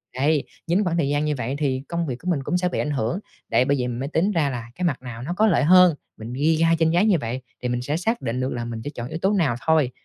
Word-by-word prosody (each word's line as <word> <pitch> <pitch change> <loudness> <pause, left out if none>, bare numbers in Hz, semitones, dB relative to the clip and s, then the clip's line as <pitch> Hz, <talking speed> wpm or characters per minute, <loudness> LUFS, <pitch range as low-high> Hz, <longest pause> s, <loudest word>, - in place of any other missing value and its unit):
Đấy, 145 +3 +2 0.2
nhín 180 +5 +2
khoảng 170 -3 0
thời 145 -5 +1
gian 145 +1 +1
như 150 -1 0
vậy 125 +3 -3
thì 135 -3 0
công 170 -1 -2
việc 130 - -2
của 180 - -10
mình 140 -5 -1
cũng 180 - 0
sẽ 180 0 0
bị - - -3
ảnh 150 - -1
hưởng. 130 - -1 0.3
Đấy, 125 - +3
bởi 140 +1 +2
vậy 125 - -1
mới 125 +2 -3
tính 170 +6 +1
ra 160 -7 +1
là 120 -3 -4
cái 180 - -2
mặt 145 -8 0
nào 120 -3 -8
nó 140 +8 -3
có 215 +4 +3
lợi 180 - +3
hơn, 180 +1 +6 0.2
mình 115 +2 -7
ghi 150 +5 +2
ra 165 +1 +3
trên 160 -1 +3
giấy 175 +5 +3
như 205 -5 +4
vậy 120 +3 -3 0.2
thì 125 - 0
mình 120 0 -1
sẽ 145 +5 -1
xác 225 +7 -1
định 115 +2 -2
được 130 +1 -1
là 120 -1 -4
mình 115 -1 -5
sẽ - - -4
chọn 120 -5 -6
yếu 160 - -5
tố 195 +2 +2
nào 160 - +2
thôi. 155 -5 +3
150 Hz, 310 wpm, -23 LUFS, 125-170 Hz, 0.3 s, hơn